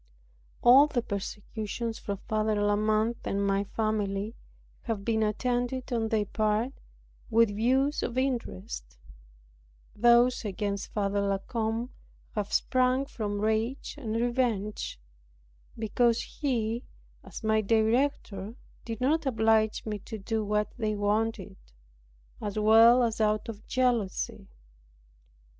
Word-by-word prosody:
All 265 +5 +8
the 245 -5 -1
persecutions 215 +3 -4
from 200 -1 -4
Father 215 0 +1
La 205 0 +2
Mothe 215 +2 +1
and 200 0 -1
my 200 0 +1
family 210 -1 -2 0.5
have 215 -4 -3
been 220 -1 +1
attended 245 +4 -1
on 225 -2 0
their 215 -2 +1
part 215 +4 0 0.6
with 225 -2 +3
views 265 +6 +2
of 240 - -3
interest; 90 - -3 1.0
those 240 +3 +4
against 200 -1 -3
Father 200 -1 0
La 200 -1 +1
Combe 225 +4 -3 0.4
have 210 -2 -3
sprung 255 +1 +2
from 205 -7 -4
rage 220 +5 -1
and 230 -7 -4
revenge, 230 - -1 0.8
because 230 +1 +2
he, 235 -4 -2 0.4
as - - -10
my 220 0 +3
director, 220 -1 0 0.3
did 225 -1 -6
not 295 +3 +1
oblige 220 -2 +2
me 210 -2 -3
to 220 - -7
do 220 +2 -2
what 210 0 0
they 215 -2 0
wanted; 205 -1 -1 0.9
as 205 0 -4
well 225 +3 +7
as 225 -1 -1
out 215 0 +1
of 220 -2 -8
jealousy. 245 -7 0
220 Hz, 120 wpm, -28 LUFS, 210-240 Hz, 1.0 s, All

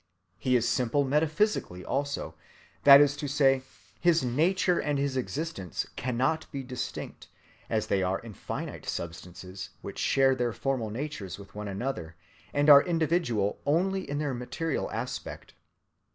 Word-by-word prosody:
He 130 -1 +2
is 120 -1 +2
simple 130 +3 +1
metaphysically 150 - 0
also, 140 +1 -2 0.5
that 140 -1 +11
is 145 -1 +3
to 150 -1 -3
say, 135 -2 +3 0.4
his 170 -4 +3
nature 170 +8 +2
and 145 -1 0
his 140 -1 -1
existence 135 - -3
cannot 130 +6 -1
be 140 -3 -4
distinct, 125 -1 -6 0.4
as - - 0
they 95 - +1
are 95 +1 +1
in 115 -2 -10
finite - - -6
substances 90 +3 -6
which 100 - -7
share 135 -1 +4
their 120 -3 -1
formal 130 -4 -1
natures 115 - -5
with 100 -1 -13
one 105 0 -6
another, 100 -6 -4 0.4
and 145 +1 +1
are 140 -1 +10
individual 160 - 0
only 185 +6 0
in 145 - -2
their 145 -2 -1
material 135 +5 -3
aspect. - - -6
135 Hz, 145 wpm, -28 LUFS, 110-150 Hz, 0.5 s, that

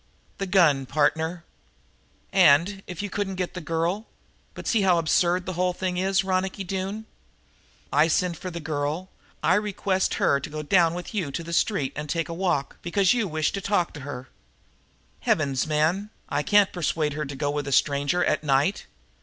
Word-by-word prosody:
"The 195 - -2
gun, 155 -8 +4
partner." 160 +4 0 0.9
"And, 170 +8 +5
if 180 +1 -5
you 205 - -3
couldn't 200 -2 -2
get 180 -1 -3
the 180 - -6
girl 170 +7 -1 0.5
but - - -8
see 225 - +2
how 185 -3 +4
absurd 175 +2 +2
the 185 - -3
whole 180 +1 0
thing 180 0 -3
is, 195 +1 +2
Ronicky 190 +1 -1
Doone! 195 +3 -4 0.9
I 150 +3 +5
send 175 +1 +1
for 185 - -6
the 170 -1 -6
girl; 155 +3 -3 0.3
I 160 - +4
request 195 -1 0
her 140 - +2
to 140 - -7
go 155 0 -5
down 170 +1 +3
with 180 +4 -7
you 185 -9 -1
to 170 - -4
the 170 +1 -7
street 165 -6 +1
and 150 0 -5
take 165 +1 -1
a - - -3
walk, 170 -6 -1
because 190 +3 +2
you 235 -4 0
wish 155 -2 0
to 195 - -4
talk 195 -4 0
to 150 - -8
her. 130 -2 -7 0.9
Heavens, 140 -3 +1
man, 160 +7 +1 0.2
I - - 0
can't 205 +5 +3
persuade 155 -3 -1
her 150 +1 -3
to 140 +1 -7
go 145 +1 -1
with 145 0 -3
a - - -3
stranger 145 +5 +2
at - - 0
night! 145 +7 +1
170 Hz, 185 wpm, -25 LUFS, 150-190 Hz, 0.9 s, And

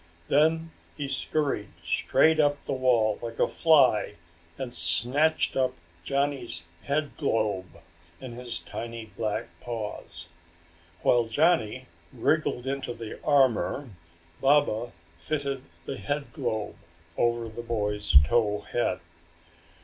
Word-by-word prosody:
Then 160 +3 +3 0.3
he 145 - -3
scurried 135 -5 -1
straight 160 0 +3
up 145 -1 +2
the - - -3
wall 120 -5 +2
like 115 -1 -6
a - - +3
fly 135 -10 +4 0.4
and 125 -2 -5
snatched 120 - +2
up 130 -1 +1 0.3
Johnny's 135 -9 0 0.2
headglobe 115 - -1 0.4
in 130 - -8
his 120 0 -3
tiny 115 -2 -7
black 105 0 -2
paws. 105 -7 -5 0.7
While 120 -1 +4
Johnny 130 -2 +2 0.3
wriggled 155 -5 0
into 135 -3 -3
the 115 -2 -8
armor 135 -2 +2 0.5
Baba 130 -5 +3 0.3
fitted 140 - -3 0.2
the 135 - -4
headglobe 135 -7 -3 0.4
over 120 -1 +1
the 110 +1 -7
boy's 105 -7 +1
tow 105 +5 +1
head. 95 -6 -1
120 Hz, 105 wpm, -27 LUFS, 110-145 Hz, 0.7 s, fly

